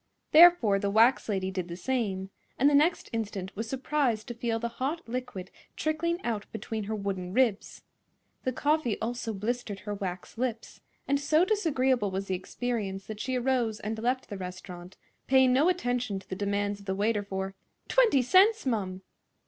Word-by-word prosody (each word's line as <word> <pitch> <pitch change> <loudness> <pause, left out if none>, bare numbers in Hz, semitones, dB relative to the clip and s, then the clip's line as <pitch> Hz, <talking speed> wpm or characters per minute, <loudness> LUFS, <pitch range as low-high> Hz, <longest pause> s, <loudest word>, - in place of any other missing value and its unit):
Therefore 310 - +7
the 200 0 -1
wax 225 +4 +4
lady 190 -2 -1
did 185 -2 -3
the 170 0 -7
same, 195 -5 -2 0.3
and 275 - +4
the 290 - +4
next 305 +5 +3
instant 200 -4 -4
was 220 +2 -4
surprised 265 -4 0
to - - -3
feel 235 -1 -1
the 235 +1 -2
hot 310 +4 -2
liquid 240 -6 -5 0.2
trickling 335 +2 -1
out 215 -3 -2
between 220 -1 -4
her 215 +2 -2
wooden 190 -3 -4
ribs. 230 -4 0 0.6
The 255 - 0
coffee 290 -3 0
also 230 0 -3
blistered 215 0 -3
her 210 0 -4
wax 190 +2 -6
lips, 240 -3 -3 0.3
and 280 0 +2
so 310 +4 +3
disagreeable 265 - +1
was 190 +1 -3
the 190 - -1
experience 195 -1 -4
that 215 -1 -7
she 260 +2 -2
arose 245 -3 0
and 220 +1 -4
left 250 +3 -1
the 200 -3 -6
restaurant, 180 0 -8 0.3
paying 260 -1 +5
no 290 +7 +4
attention 245 - -1
to 190 - -10
the 185 - -4
demands 205 +1 -1
of 200 - -15
the 190 - -1
waiter 205 +1 +1
for 195 -1 -4 0.3
"20 455 - +4
cents, 395 - +5
mum." 190 -6 -2
225 Hz, 175 wpm, -28 LUFS, 195-260 Hz, 0.6 s, Therefore